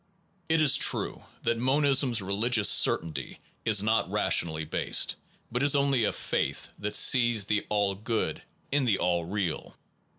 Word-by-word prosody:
It 160 Hz, -1 st, +3 dB
is 145 Hz, -, +5 dB
true -, -, 0 dB, 0.2 s
that 115 Hz, -, -1 dB
monism 135 Hz, +1 st, +2 dB
s 115 Hz, -3 st, 0 dB
religious 105 Hz, +3 st, 0 dB
certainty 80 Hz, -1 st, +1 dB, 0.3 s
is 105 Hz, -3 st, +3 dB
not 110 Hz, +1 st, 0 dB
rationally 80 Hz, -2 st, 0 dB
based, 75 Hz, -, 0 dB, 0.4 s
but 125 Hz, +2 st, -2 dB
is 140 Hz, 0 st, +3 dB
only 140 Hz, -4 st, +2 dB
a -, -, 0 dB
faith -, -, -3 dB
that 105 Hz, 0 st, -4 dB
sees 120 Hz, -5 st, +3 dB
the 105 Hz, 0 st, -1 dB
All 100 Hz, -2 st, 0 dB
Good 110 Hz, +3 st, -3 dB, 0.3 s
in 140 Hz, -1 st, +1 dB
the 105 Hz, -5 st, +2 dB
All 85 Hz, -1 st, -1 dB
Real. 90 Hz, -3 st, -4 dB
110 Hz, 155 wpm, -27 LUFS, 100-130 Hz, 0.4 s, is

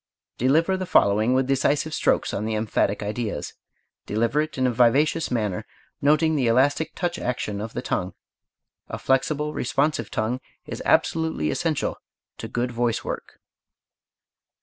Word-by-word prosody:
Deliver 160 Hz, +9 st, +3 dB
the 185 Hz, -1 st, -4 dB
following 110 Hz, -, +3 dB
with 130 Hz, 0 st, +2 dB
decisive 140 Hz, +3 st, +1 dB
strokes -, -, +1 dB
on 105 Hz, -, -2 dB
the 110 Hz, 0 st, -1 dB
emphatic 105 Hz, -1 st, 0 dB
ideas. 105 Hz, -6 st, -3 dB, 0.5 s
Deliver 115 Hz, +7 st, +1 dB
it 155 Hz, -1 st, -5 dB
in 130 Hz, -, +1 dB
a 125 Hz, -, +3 dB
vivacious 135 Hz, +7 st, +3 dB
manner, 105 Hz, -7 st, -1 dB, 0.4 s
noting 155 Hz, +2 st, +3 dB
the 130 Hz, -5 st, +1 dB
elastic 140 Hz, +7 st, +2 dB
touch 175 Hz, -1 st, -2 dB
action 110 Hz, -5 st, -3 dB
of 110 Hz, +1 st, -6 dB
the -, -, -4 dB
tongue. -, -, -2 dB, 0.7 s
A -, -, -4 dB
flexible, 150 Hz, +3 st, 0 dB
responsive 135 Hz, -2 st, 0 dB
tongue 120 Hz, +4 st, -2 dB, 0.2 s
is -, -, -6 dB
absolutely 160 Hz, -, +1 dB
essential -, -, -1 dB, 0.4 s
to -, -, -5 dB
good 120 Hz, +1 st, -2 dB
voice 120 Hz, -1 st, 0 dB
work. -, -, -6 dB
125 Hz, 145 wpm, -24 LUFS, 110-150 Hz, 0.7 s, Deliver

